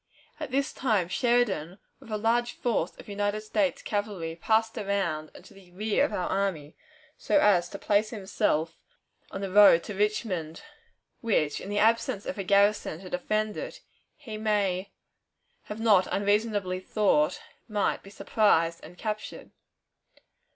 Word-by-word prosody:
At 305 -3 -5
this 275 +2 -1
time 210 -9 0
Sheridan, 205 - +1 0.2
with - - -15
a 215 - -1
large 235 +3 +1
force 220 -8 -1
of - - -13
United 205 +1 -2
States 275 +7 -1
cavalry, 205 -6 -3
passed 220 +5 +1
around 195 -8 -2
and - - -13
to - - -15
the 195 -2 -17
rear 215 +6 +1
of 290 - 0
our 180 - -2
army, 185 -7 -2 0.4
so 305 - +2
as 180 -7 +3
to 200 - -7
place 210 +2 +1
himself 190 -6 -1 0.5
on 195 - -6
the 195 -1 -4
road 200 -4 +7
to 210 - -6
Richmond, 195 - -2 0.6
which, 155 -10 0
in 195 - -7
the 205 - -2
absence 225 0 +2
of - - -5
a - - -1
garrison 200 -3 +2
to 185 - -10
defend 215 +4 -1
it, - - -7 0.3
he 245 -8 -8
may 200 -3 0 0.8
have 210 +1 -7
not 210 -5 +4
unreasonably 205 -2 0
thought 185 -5 +1 0.3
might 210 -3 0
be 195 - -13
surprised 170 -5 +1
and 175 +3 -12
captured. 215 +1 -5
205 Hz, 150 wpm, -27 LUFS, 185-220 Hz, 0.8 s, road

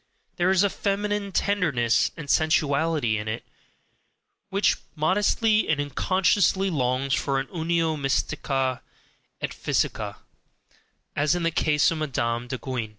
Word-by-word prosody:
There 175 0 +2
is 190 0 +4
a 200 - +3
feminine 205 0 -2
tenderness 150 - +1
and 150 -3 -7
sensuality 150 -5 +2
in 105 - -6
it, 110 +1 -4 1.0
which 200 +1 +2 0.2
modestly 210 +7 +2
and 150 -1 +2
unconsciously 190 +6 +1
longs 130 -2 0
for 135 -1 0
a 135 - -3
UNIO 165 +1 0
MYSTICA 135 -2 -1 0.6
ET - - -3
PHYSICA, - - -1 1.0
as 150 +4 +2
in 175 - -2
the 165 - +1
case 150 -2 +2
of 165 - -3
Madame 120 -5 -2
de 130 - -4
Guyon. 125 -4 -4
155 Hz, 130 wpm, -25 LUFS, 135-185 Hz, 1.0 s, is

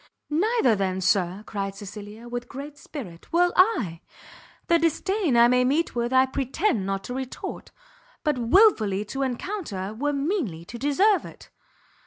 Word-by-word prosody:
"Neither, 345 - +3
then, 190 -2 -1
Sir," 185 +1 +1
cried 195 -2 -4
Cecilia, 205 +3 -9
with 245 0 -5
great 280 +2 -8
spirit, 215 - -10
"will 350 +1 +3
I! 345 - +2 0.6
The 340 0 +3
disdain 335 - +1
I 235 0 +7
may 250 +1 +3
meet 290 +6 +1
with 240 0 -1
I 260 0 +5
pretend 260 - -1
not 195 0 -2
to 245 - -6
retort, 260 0 -6 0.5
but 300 -4 0
wilfully 230 - +4
to 270 +6 -5
encounter, 250 - -3
were 290 +6 -1
meanly 280 - -2
to 235 - -9
deserve 370 - +3
it. - - -13
250 Hz, 150 wpm, -25 LUFS, 205-320 Hz, 0.6 s, I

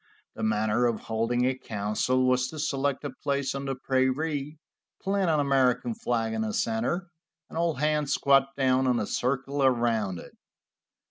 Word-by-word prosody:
The - - -8
manner 110 +2 +2
of 115 -2 -2
holding 115 +2 0
a 130 0 +1
council 110 +3 0
was 125 0 +2
to 155 - -9
select 140 -2 -1
a 145 - -4
place 140 0 -2
on 140 0 -4
the 135 -1 -2
prairie, 135 +3 -1 0.4
plant 195 -2 0
an 155 -2 +2
American 135 - +2
flag 115 - -1
in 110 - -1
the 110 -1 -2
center, 125 +11 -1 0.4
and - - -11
all 165 -1 +1
hands 150 0 0
squat 135 -1 +4
down 130 -1 +2
in 125 -1 +2
a 110 - -1
circle 135 +5 -1
around 115 -7 +1
it. - - -11
130 Hz, 165 wpm, -27 LUFS, 120-140 Hz, 0.4 s, squat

